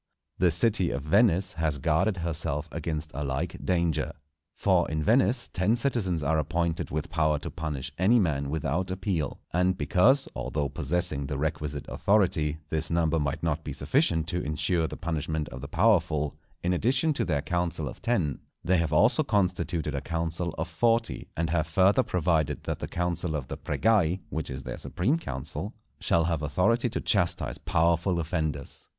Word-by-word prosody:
The 90 - +5
city 95 +2 +2
of 70 - -3
Venice 95 +2 +3
has 80 -2 0
guarded 80 +8 +1
herself 80 -2 -2
against 80 -1 -3
a 70 +3 -3
like 70 +5 -3
danger. 85 -4 0 0.4
For 95 -5 +2
in 80 -1 -1
Venice 120 - +3
ten 95 +6 +2
citizens 110 - -1
are 80 +2 +2
appointed 85 +2 -1
with 75 0 -3
power 75 -2 +2
to 75 - -6
punish 75 -5 -4
any 105 +6 +5
man 75 -9 +1
without 80 +4 -1
appeal; 95 -6 -2
and 90 +1 +2
because, 100 - +3
although 70 +3 -2
possessing 75 -1 -1
the 70 - -3
requisite 75 -1 -2
authority, 85 -7 +2
this 80 0 -1
number 85 -1 +2
might 70 +1 -2
not 80 -1 0
be 75 - -5
sufficient 80 - +1
to 90 +1 -1
insure 80 +2 0
the - - -7
punishment 80 -2 -2
of 65 - -8
the 70 - -6
powerful, 85 -5 +2 0.3
in 90 +1 +2
addition 130 - +2
to - - -1
their 75 -4 0
council 85 -2 -1
of - - -8
Ten, 90 - 0 0.2
they 95 +1 +3
have 85 -2 0
also 110 - +4
constituted 90 - 0
a 70 - -2
council 85 +2 -2
of 80 +2 -2
Forty, 115 +7 0
and 80 -1 0
have 80 -1 +1
further 95 +8 +4
provided 85 - 0
that - - -3
the - - -4
council 85 -2 -2
of 70 -4 -4
the - - -4
"Pregai," 95 -6 +2
which 80 - -3
is 65 -1 -6
their - - -6
supreme 130 - 0
council, 70 - -5 0.2
shall 85 - +2
have 85 -2 0
authority 110 +11 +2
to 115 - -3
chastise 90 -4 0
powerful 85 +2 +2
offenders. 80 -4 -3
85 Hz, 170 wpm, -28 LUFS, 75-95 Hz, 0.4 s, The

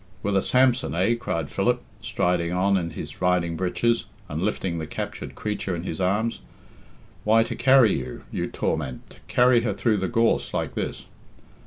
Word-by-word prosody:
"With 100 0 0
a 95 - +4
Samson, 130 -5 +2
eh?" 95 +7 +3
cried 85 -10 -3
Philip, - - +1 0.2
striding 85 -1 0
on 95 +2 +2
in 85 -3 0
his - - -8
riding 90 -2 +2
breeches, 115 +7 0 0.2
and 75 +2 -4
lifting 95 -4 -1
the 80 - -5
captured - - -6
creature 105 -3 -3
in 85 - -5
his 90 0 -4
arms. 105 +5 0 0.8
"Why, 110 +1 +5
to - - -5
carry 130 - +5
her, 65 -1 -8
you - - -2
torment, 75 -6 -3
to - - -15
carry 125 -1 +4
her 110 -3 -1
through 110 +2 +1
the 95 -1 -1
gorse 115 -1 +1
like - - -2
this." - - -4
95 Hz, 175 wpm, -25 LUFS, 85-115 Hz, 0.8 s, Why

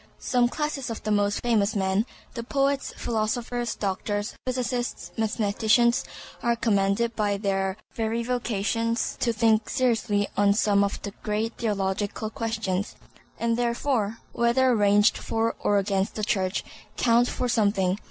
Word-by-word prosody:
Some 245 -1 +2
classes 295 -2 -3
of 225 - -5
the 215 - -1
most 205 0 +1
famous 220 -3 +2
men—the 200 +5 -2
poets, 275 +1 0
philosophers, 235 +1 -2
doctors, 205 +1 -2
physicists, 250 -1 -2
mathematicians—are 225 +2 +1
commanded 220 +1 +1
by 205 -2 0
their 195 -1 -1 0.2
very 225 +1 -1
vocations 230 -1 -1
to 235 - +2
think 220 -1 +2
seriously 225 -5 +1
on 200 0 +4
some 205 -2 +3
of 200 - -2
the 200 - -4
great 215 +2 -1
theological 205 0 -1
questions, 220 -4 -2 0.4
and 230 0 +1
therefore, 235 -2 0
whether 240 +1 +3
ranged 205 +1 +4
for 225 0 -1
or 205 - +2
against 195 0 0
the 215 - -3
Church, 190 -2 0 0.3
count 240 0 +4
for 250 - -2
something. 200 -5 +1
220 Hz, 130 wpm, -26 LUFS, 205-235 Hz, 0.4 s, on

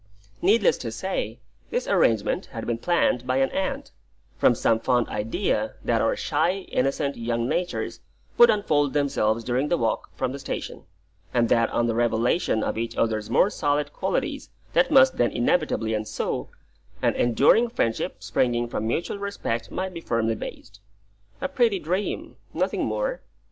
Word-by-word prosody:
Needless 205 +3 +3
to 115 - -4
say, 115 - -3 0.3
this - - -2
arrangement 110 -3 +2
had - - -7
been 115 -1 -2
planned 125 -6 +1
by 130 +1 +1
an 135 0 +2
aunt, 190 -1 -3 0.4
from - - +4
some 115 - +2
fond 120 0 +1
idea 105 +1 -1
that - - +2
our - - +2
shy, 170 +7 0
innocent 140 +2 0
young 115 0 -1
natures 175 +6 -2 0.4
would 475 - +7
unfold 145 -9 +2
themselves 115 -6 +1
during 125 +5 0
the 175 - +1
walk 115 -1 -1
from 130 -1 -1
the 140 - -6
station, - - -6 0.5
and 120 -1 +3
that 115 -1 +3
on 120 - +1
the 115 - 0
revelation 115 +1 +1
of - - -2
each 115 0 -3
other's 110 -2 0
more 205 - +3
solid 145 -4 0
qualities - - -2 0.2
that - - +3
must - - +6
then - - +3
inevitably 245 - 0
ensue, 110 0 -3 0.5
an - - +3
enduring 140 - +4
friendship 115 - -2
springing 120 -1 +1
from 110 -2 -3
mutual 170 - -2
respect 200 -13 -3
might 185 0 -4
be 170 - -7
firmly 115 -5 0
based. 105 -2 -9 0.6
A 275 - 0
pretty 240 -7 +2
dream, 185 +4 -3 0.2
nothing - - 0
more. - - -2
130 Hz, 160 wpm, -25 LUFS, 115-180 Hz, 0.6 s, would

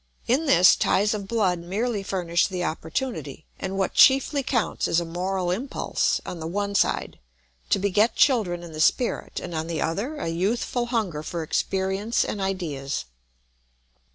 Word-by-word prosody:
In 275 +7 +1
this 180 -9 +7
ties 205 +3 +2
of 200 -2 -4
blood 195 -6 +1
merely 205 +5 -2
furnish 175 -3 0
the 185 -2 -3
opportunity, 160 - -4
and 190 +1 -4
what 190 -1 0
chiefly 275 +2 +5
counts 245 -4 -1
is 165 - +2
a 170 - -3
moral 180 +2 -2
impulse, 245 +9 -1
on 175 - -6
the 160 - -4
one 200 +3 -2
side, 200 - 0 0.5
to - - +3
beget 205 +3 +2
children 200 -11 +2
in 170 - -9
the 155 0 -4
spirit, 245 +8 +1
and 175 - -7
on 160 0 -3
the 165 -2 -3
other 205 - -2
a 290 - -4
youthful 225 +7 -1
hunger 210 -11 -1
for 165 +1 -4
experience 190 +7 0
and 205 - -4
ideas. 155 - -3
190 Hz, 160 wpm, -25 LUFS, 170-225 Hz, 0.5 s, this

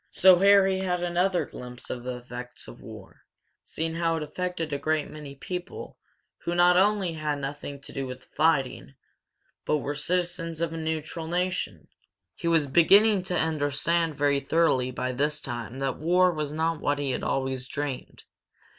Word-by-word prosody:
So 185 -1 +6
Harry 195 -1 +5
had 180 -2 -1
another 175 +1 +1
glimpse 125 0 -9
of 120 - -5
the 125 0 -4
effects 125 0 -8
of - - -12
war, - - -12 0.4
seeing 160 +1 -3
how 165 0 +1
it 160 - -2
affected 170 0 -3
a 140 - -1
great 155 0 0
many 150 -2 -9
people 180 +5 -7 0.4
who 175 - -3
not 175 0 +5
only 195 -2 +3
had 155 -2 -2
nothing 140 0 -6
to - - -11
do 135 -1 -3
with 125 0 -7
the - - -24
fighting, 140 -3 +1 0.7
but 150 - +1
were 145 0 -3
citizens 170 +1 -1
of 165 -1 -1
a - - -4
neutral 160 +1 -3
nation. 175 - -2 0.5
He 170 - -5
was 165 -3 +3
beginning 195 +8 +5
to 180 -1 -1
understand 160 +1 0
very 140 0 +2
thoroughly 140 -5 +2
by 130 0 -3
this 145 +4 0
time 120 -2 -6
that 135 -1 -2
war 180 +3 +4
was 150 -3 -3
not 160 +1 -1
what 145 0 +1
he 140 -2 -1
had - - -2
always 130 -1 -2
dreamed. 140 -1 -5
155 Hz, 175 wpm, -27 LUFS, 140-175 Hz, 0.7 s, So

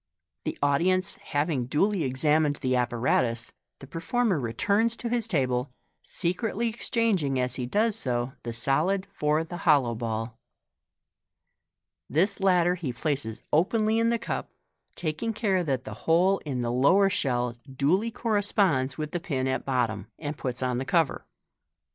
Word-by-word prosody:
The - - -3
audi 145 +5 +3
ence 185 0 +1
having 145 -4 -1
duly 190 +6 +1
examined 150 +3 +2
the 130 -2 -1
ap 125 -1 +1
paratus, 115 -1 0 0.3
the - - -11
performer 185 - 0
returns 205 - +1
to 235 - -4
his 235 -2 0
table, 130 - 0 0.3
secretly 225 +6 -1
exchanging 215 - 0
as 125 -1 +1
he 125 -2 -3
does 215 - +2
so 125 - -1
the 120 - -5
solid 155 +12 +1
for 150 -1 +1
the 175 +2 -7
hollow 145 -8 +3
ball. 115 0 -4 1.7
This 185 +8 +1
latter 180 -2 +3
he 170 -7 -3
places 135 -3 -2
openly 215 +7 +2
in 230 0 +3
the 235 - +2
cup, 230 - -4 0.5
taking 170 +8 -2
care 200 -4 +1
that 135 -5 -1
the - - -7 0.2
hole 185 +4 +4
in 130 -4 -2
the 120 - -1
lower 140 +11 +4
shell 125 -9 0 0.2
duly 160 - +1
corresponds 200 - +1
with 155 -1 -4
the 175 - -2
pin 135 -6 -2
at 130 0 -1
bottom, 115 -6 -1
and 150 -1 -4
puts 130 -2 -4
on 125 -1 0
the - - -2
cover. 165 -1 +1
150 Hz, 155 wpm, -27 LUFS, 130-195 Hz, 1.7 s, hole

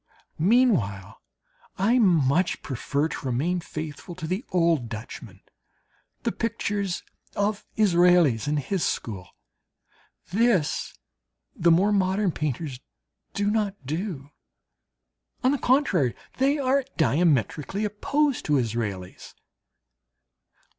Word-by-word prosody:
Meanwhile 175 - +2 0.6
I 225 +7 +3
much 170 - +2
prefer 140 +3 -1
to 145 - -6
remain 155 +9 0
faithful 155 +1 -7
to 170 -2 -6
the 185 +8 -2
old 165 -9 +1
Dutchmen, 110 -1 -8 0.8
the - - 0
pictures 205 -4 -2 0.3
of 205 +1 -1
Israels 175 - +4
and 150 +1 +1
his 160 +5 -1
school. 95 -5 -3 1.0
This 210 -8 +1 0.6
the 170 -7 +3
more 185 +5 +4
modern 195 -1 +2
painters 145 -3 -3 0.6
do 205 +1 +1
not 210 -2 0
do; 155 -2 -4 1.1
on 255 - +4
the 285 - 0
contrary, 205 - +2 0.2
they 275 +3 +3
are 275 0 +2
diametrically 160 - +1
opposed 275 +7 0
to 150 -2 +2
Israels. 105 -6 -4
175 Hz, 100 wpm, -25 LUFS, 140-210 Hz, 1.1 s, Israels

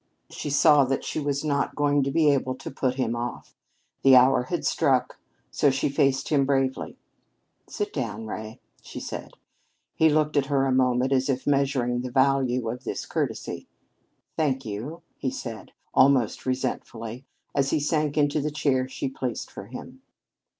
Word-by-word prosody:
She - - -5
saw 145 0 +5
that 135 +1 -1
she - - -3
was 145 -1 -1
not 140 -2 0
going 145 -1 +2
to 135 - 0
be 150 +1 +4
able 130 -2 0
to - - -8
put 130 -1 -1
him 120 -3 -1
off. 120 +1 -6 0.5
The 135 -1 +7
hour 125 0 +5
had - - -3
struck. - - +1 0.3
So 145 - +3
she 135 +1 0
faced 135 -2 +1
him 145 -3 +3
bravely. 135 -1 -1 0.7
"Sit 205 0 -3
down, 110 -5 -3
Ray," 110 0 -7 0.2
she - - -8
said. - - -7 0.6
He 160 - +4
looked 150 0 +1
at 135 -1 +2
her 135 -1 +2
a 135 - +1
moment 130 0 +2
as 130 0 +2
if 130 -1 -1
measuring 135 -4 +1
the 125 - -4
value 130 -2 +2
of 125 +3 -4
this - - -4
courtesy. - - -3 0.7
"Thank 135 -4 0
you," 115 +11 -6 0.2
he 130 - -1
said, 120 -4 -7 0.2
almost 130 -3 +3
resentfully, 120 -2 -3 0.3
as 140 -1 +1
he - - +1
sank 150 0 0
into 145 0 +2
the 150 - -1
chair 135 -3 0
she 130 - -4
placed 130 -3 -4
for - - -9
him. - - -10
135 Hz, 170 wpm, -26 LUFS, 125-145 Hz, 0.7 s, The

